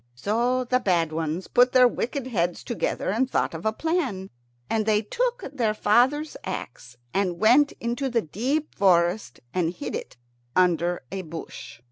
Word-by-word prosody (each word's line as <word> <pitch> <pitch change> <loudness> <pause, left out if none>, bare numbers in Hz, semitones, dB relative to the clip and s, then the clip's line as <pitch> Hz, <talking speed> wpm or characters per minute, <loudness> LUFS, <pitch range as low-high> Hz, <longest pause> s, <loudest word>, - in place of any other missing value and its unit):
So 235 - 0
the 255 +1 +1
bad 175 -8 +1
ones 160 +3 -3
put 250 +1 +4
their 250 -1 +7
wicked 250 +2 -3
heads 175 -8 -1
together 235 -5 -2
and 255 +5 +1
thought - - 0
of 165 +6 -3
a - - +3
plan. 255 - -2 0.4
And 220 -1 -1
they 215 0 +3
took - - -1
their 225 -6 0
father's 265 +9 +2
axe, 125 -9 -7 0.2
and 185 -3 0
went 255 +7 +5
into 240 +4 -3
the 235 -2 +1
deep 260 - -2
forest 180 - +2
and 170 -2 +1
hid 150 -5 -6
it - - -6 0.4
under 175 -2 +2
a 195 - -3
bush. 160 -8 -9
215 Hz, 160 wpm, -25 LUFS, 175-250 Hz, 0.4 s, their